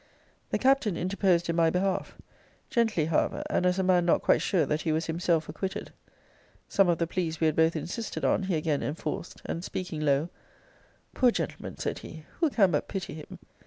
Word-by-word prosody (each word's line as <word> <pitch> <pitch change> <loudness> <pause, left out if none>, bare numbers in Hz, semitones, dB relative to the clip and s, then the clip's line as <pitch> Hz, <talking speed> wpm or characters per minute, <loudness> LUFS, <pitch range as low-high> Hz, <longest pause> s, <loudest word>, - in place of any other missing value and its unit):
The - - +1
Captain 255 -9 +2
interposed 185 -2 +1
in 170 - 0
my 165 -1 +4
behalf; 185 +2 -1 0.5
gently, 225 -9 +2
however, 160 -1 0
and 180 - +2
as 180 +1 +1
a 190 - +1
man 180 -1 +4
not 170 - +2
quite - - +4
sure 175 -7 +2
that 150 +3 -1
he 160 - 0
was 160 +1 0
himself 165 0 0
acquitted. 190 -1 -5 0.8
Some 195 -2 +3
of 170 - +3
the 170 - +1
pleas 165 -2 -2
we 160 - +2
had 155 -1 +2
both 160 +1 +3
insisted 185 +8 -4
on - - +2
he 190 -2 -1
again 155 -2 0
enforced; 150 +3 -4
and, 170 - -4
speaking 180 -5 -4
low, 145 +2 +2 0.8
Poor 255 - +4
gentleman! - - -4
said - - -3
he, 160 -1 -10
who 325 -2 +3
can 200 -9 +3
but 150 - 0
pity 195 -2 -4
him? 155 -1 -9
170 Hz, 195 wpm, -28 LUFS, 160-190 Hz, 0.8 s, my